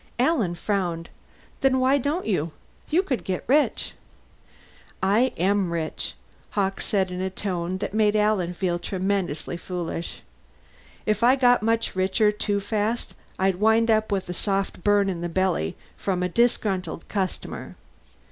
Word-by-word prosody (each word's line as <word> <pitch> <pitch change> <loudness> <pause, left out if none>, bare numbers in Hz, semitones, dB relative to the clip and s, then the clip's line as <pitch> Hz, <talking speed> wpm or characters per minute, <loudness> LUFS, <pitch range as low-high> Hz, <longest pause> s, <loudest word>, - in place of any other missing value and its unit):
Alan 245 - +2
frowned. 175 -3 -2 0.5
"Then 265 -1 +3
why 265 +2 +4
don't 295 +7 -1
you? 165 -6 0 0.4
You 345 +5 +3
could 265 -10 -2
get 185 -2 -2
rich!" 290 +3 +2 1.1
"I 220 +7 +3
am 190 0 +2
rich," 165 -2 -3 0.4
Hawkes 195 -1 0
said 190 -3 +1
in 180 0 -3
a 190 - -1
tone 185 -2 -2
that 195 - -4
made 215 -1 +3
Alan 210 -5 +2
feel 175 -1 0
tremendously 185 -3 -2
foolish. 175 -2 -5 0.8
"If 215 0 +1
I 245 +3 +6
got 245 -2 +4
much 230 -1 0
richer 190 +3 +3
too 210 -1 -1
fast 215 +3 -1 0.2
I'd 190 -1 +2
wind 220 +3 +4
up 215 0 +2
with 195 -2 0
a 180 - -3
soft 195 -1 -1
burn 205 -1 +4
in 180 -3 -2
the 175 - -2
belly 180 - 0 0.2
from 185 -2 -1
a 180 - 0
disgruntled 200 -5 0
customer. 190 -3 -3
195 Hz, 145 wpm, -25 LUFS, 180-220 Hz, 1.1 s, I